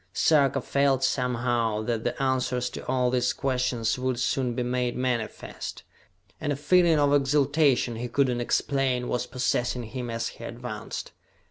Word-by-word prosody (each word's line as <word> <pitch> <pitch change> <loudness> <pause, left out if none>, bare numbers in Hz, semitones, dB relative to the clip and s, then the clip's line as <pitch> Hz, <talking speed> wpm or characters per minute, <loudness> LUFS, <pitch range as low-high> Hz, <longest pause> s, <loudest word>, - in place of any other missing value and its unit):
Sarka 140 +1 +3
felt, 140 0 +1
somehow, 120 -4 0
that 115 0 -2
the - - -2
answers 130 -2 0
to - - -7
all 125 -1 +1
these 125 -1 +1
questions 125 -3 -1
would 130 -1 -1
soon 125 -1 0
be 125 - -1
made 125 0 -1
manifest, 125 -3 -3 0.6
and 145 - -2
a - - 0
feeling 165 +3 +4
of 145 -1 +3
exaltation 140 -3 +2
he 120 +2 -3
could 135 +3 +2
not 120 -1 -1
explain 130 0 0
was 125 0 -1
possessing 125 -1 -1
him 120 +2 -5
as 115 0 -2
he - - -12
advanced. - - -6
125 Hz, 155 wpm, -26 LUFS, 120-135 Hz, 0.6 s, feeling